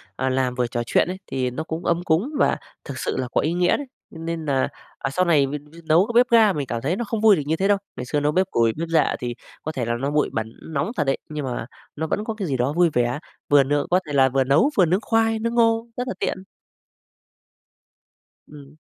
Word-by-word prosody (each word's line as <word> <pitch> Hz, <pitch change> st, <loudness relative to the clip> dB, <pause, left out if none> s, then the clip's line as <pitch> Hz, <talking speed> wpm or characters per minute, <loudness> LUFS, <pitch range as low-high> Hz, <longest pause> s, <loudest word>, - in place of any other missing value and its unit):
à, 130 Hz, -, -1 dB
làm 130 Hz, -1 st, 0 dB
vừa 125 Hz, -1 st, 0 dB
trò 120 Hz, 0 st, -2 dB
chuyện 115 Hz, -, +2 dB
ấy, 185 Hz, +1 st, -5 dB
thì 130 Hz, -1 st, -1 dB
nó 145 Hz, +6 st, -4 dB
cũng 160 Hz, +2 st, -5 dB
ấm 170 Hz, +1 st, +1 dB
cúng 175 Hz, -, +1 dB
và -, -, +3 dB, 0.3 s
thực -, -, -6 dB
sự -, -, -2 dB
là 130 Hz, -, -1 dB
có -, -, +2 dB
ý 160 Hz, +3 st, 0 dB
nghĩa 175 Hz, 0 st, +2 dB
đấy. 285 Hz, -2 st, -6 dB, 0.2 s
Cho -, -, -11 dB
nên 165 Hz, 0 st, -4 dB
nà, 135 Hz, -3 st, +1 dB, 0.3 s
ờ, -, -, -3 dB
sau 180 Hz, +7 st, +1 dB
này 150 Hz, -5 st, +4 dB
mình 145 Hz, +1 st, -5 dB
dự 170 Hz, -, -13 dB
nấu 170 Hz, +6 st, +4 dB
cái -, -, -3 dB
bếp 245 Hz, +1 st, +5 dB
ga 220 Hz, -4 st, +5 dB
mình 140 Hz, -3 st, -3 dB
cảm 115 Hz, -1 st, -3 dB
thấy 155 Hz, +8 st, 0 dB
nó 240 Hz, -, -2 dB
không 225 Hz, 0 st, -3 dB
vui 215 Hz, -3 st, +7 dB
được -, -, -2 dB
như 160 Hz, +2 st, +1 dB
thế 195 Hz, +3 st, 0 dB
đâu. 205 Hz, -, +4 dB, 0.2 s
Ngày 125 Hz, -, -5 dB
xưa 145 Hz, +4 st, 0 dB
nấu 145 Hz, +1 st, +1 dB
bếp 185 Hz, +4 st, +2 dB
củi, 115 Hz, -1 st, +2 dB
bếp 165 Hz, +1 st, -3 dB
rạ 160 Hz, -2 st, +2 dB
thì 120 Hz, -1 st, -4 dB, 0.3 s
có 155 Hz, -, -3 dB
thể 125 Hz, -6 st, -3 dB
là 120 Hz, -, -1 dB
nó 140 Hz, +2 st, -1 dB
bụi 150 Hz, 0 st, +1 dB
bẩn, 110 Hz, 0 st, -3 dB, 0.2 s
nóng 145 Hz, +8 st, -1 dB
thật 150 Hz, -, +2 dB
đấy, 135 Hz, -1 st, 0 dB
nhưng 150 Hz, -2 st, -4 dB
mà 125 Hz, -3 st, -3 dB, 0.3 s
nó 160 Hz, +2 st, -3 dB
vẫn 205 Hz, -, -1 dB
có 220 Hz, 0 st, -3 dB
cái 205 Hz, -4 st, -4 dB
gì 135 Hz, -3 st, -1 dB
đó 125 Hz, +4 st, 0 dB
vui 175 Hz, +1 st, +4 dB
vẻ, 120 Hz, +3 st, +1 dB, 0.3 s
vừa 145 Hz, -1 st, +6 dB
nướng 145 Hz, +1 st, 0 dB
có 180 Hz, +1 st, +4 dB
thể 145 Hz, -, -5 dB
là 135 Hz, -1 st, +5 dB
vừa 135 Hz, +1 st, +2 dB
nấu 140 Hz, -, +3 dB
vừa 185 Hz, -, +6 dB
nướng 185 Hz, +6 st, +1 dB
khoai, 225 Hz, -1 st, +1 dB
nướng 230 Hz, +1 st, -2 dB
ngô, 230 Hz, 0 st, +3 dB
rất 250 Hz, +1 st, -2 dB
là -, -, -2 dB
tiện. 185 Hz, -, -2 dB, 2.0 s
Ừm. 145 Hz, -1 st, -14 dB
155 Hz, 265 wpm, -23 LUFS, 135-185 Hz, 2.0 s, vui